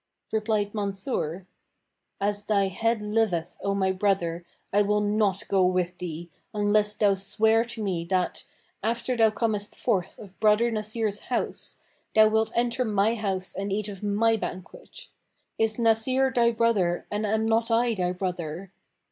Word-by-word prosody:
Replied 215 -2 0
Mansur, 195 - -3 0.7
"As 205 +1 0
thy 200 -2 +2
head 225 +3 0
liveth, 210 -6 0
O 200 0 0
my 190 -1 +1
brother, 185 -3 0 0.3
I 205 - +5
will 210 +1 +2
not 205 -2 0
go 195 -1 +3
with 180 -1 0
thee, 170 -1 -6 0.2
unless 210 0 +2
thou 205 -2 +3
swear 220 +4 +2
to 230 -2 -6
me 175 -4 -2
that, 185 0 -1 0.4
after 235 +3 -1
thou 225 -2 +5
comest 215 -2 -2
forth 190 -7 -1
of 195 -3 -13
brother 220 +2 +4
Nasir's 215 -1 -2
house, - - -3 0.4
thou 215 0 +7
wilt 220 0 +1
enter 240 +1 +1
my 210 -1 +2
house 195 -4 -3
and 195 +1 -4
eat 210 +1 -1
of 195 -2 -8
my 215 +2 +2
banquet! - - -8 0.5
Is 220 -1 +1
Nasir 250 +4 +2
thy 235 -2 +4
brother 220 -7 +1
and 205 +1 -1
am 220 +1 +1
not 225 +1 +1
I 235 +1 +2
thy 180 -3 -1
brother? 180 -1 -4
210 Hz, 155 wpm, -26 LUFS, 190-225 Hz, 0.7 s, thou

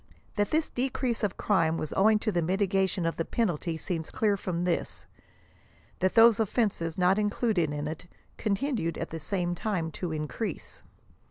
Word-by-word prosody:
That 205 -1 +1
this 315 0 +1
decrease 250 -2 -1
of 210 -4 -1
crime 165 -6 +2
was 155 - -4
owing 215 +2 +5
to 215 - 0
the 175 -3 +1
mitigation 190 0 +1
of 165 - -1
the 165 - 0
penalty 170 -6 -1
seems 160 -1 -4
clear 210 -2 +1
from 180 -3 -3
this; 175 -1 -2 0.9
that 185 +1 +1
those 230 -1 +7
of 220 -3 +1
fenses 180 -8 0
not 185 +2 +3
included 210 -6 +1
in 145 0 -3
it, 160 +3 -6 0.3
continued 215 - -1
at - - -4
the 165 - -4
same 175 +2 -1
time 175 -3 -2
to 175 +1 -4
in 155 -1 -2
crease. 225 - -5
190 Hz, 175 wpm, -28 LUFS, 165-215 Hz, 0.9 s, those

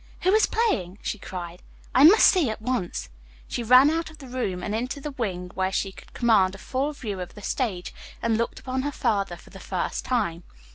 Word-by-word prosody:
"Who 370 - +3
is 435 - +5
playing?" 200 - 0
she 210 - -3
cried. 175 -2 -7 0.3
"I 260 - +6
must 370 +9 +8
see 345 - +5
at 220 - -4
once." 220 -5 -2 0.4
She - - -3
ran 255 +5 +7
out 325 0 -1
of 315 - -14
the 280 - -11
room 220 -8 -3
and 210 - -3
into 250 +6 -2
the 295 +1 -5
wing, 185 -9 -4
where 190 0 0
she 195 0 -1
could - - -15
command 205 -6 +3
a - - -9
full 265 +8 -2
view 215 -9 -5
of 180 - -7
the 205 - -11
stage, 195 -9 -2 0.3
and 230 -1 +1
looked 230 +1 -2
upon 260 0 -2
her 290 +2 -2
father 200 -9 0
for - - -17
the - - -11
first - - -3
time. 205 -10 -1
230 Hz, 220 wpm, -25 LUFS, 190-265 Hz, 0.4 s, must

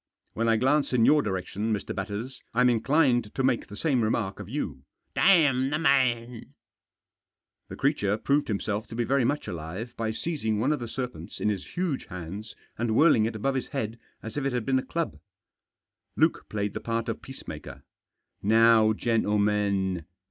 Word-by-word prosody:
"When 115 +1 0
I 115 - +4
glance 135 +3 +2
in 115 -2 +4
your 150 -1 +5
direction, 100 +1 -2
Mr. 105 -2 -2
Batters, 105 +6 -5
I'm 125 0 +5
inclined 120 -2 +2
to 135 - 0
make 130 -3 +1
the 100 - -10
same 135 -4 +1
remark 110 -3 -1
of 105 -1 -8
you." 130 - -4 0.2
" - - -50
Damn 145 -9 +4
the 150 - 0
man! 125 -6 +1 0.5
" - - -59
The - - -6
creature 105 -8 +1
proved 140 +6 +1
himself 105 0 -2
to 115 - -8
be 120 - 0
very 135 +2 +2
much 145 +5 -1
alive 90 +9 -6
by 115 -1 -2
seizing 110 -3 -2
one 135 +7 +2
of 150 - -2
the 120 - -5
serpents 115 -8 -6
in - - +1
his 100 - -5
huge 175 -6 -1
hands 95 +5 -7 0.2
and 115 -1 0
whirling 145 -8 +5
it 115 - -3
above 135 +6 0
his 130 - -2
head 115 -4 -4 0.2
as 110 +3 -6
if 145 - -1
it 135 -1 0
had 120 -3 -1
been 130 -1 +2
a - - -4
club. 165 - -3 1.0
Luke - - +2
played 105 -1 -2
the - - -4
part 115 0 -2
of - - -3
peacemaker. - - -9 0.6
"Now, 110 +1 +5
gentlemen! 105 -5 +1
115 Hz, 185 wpm, -27 LUFS, 105-135 Hz, 1.0 s, your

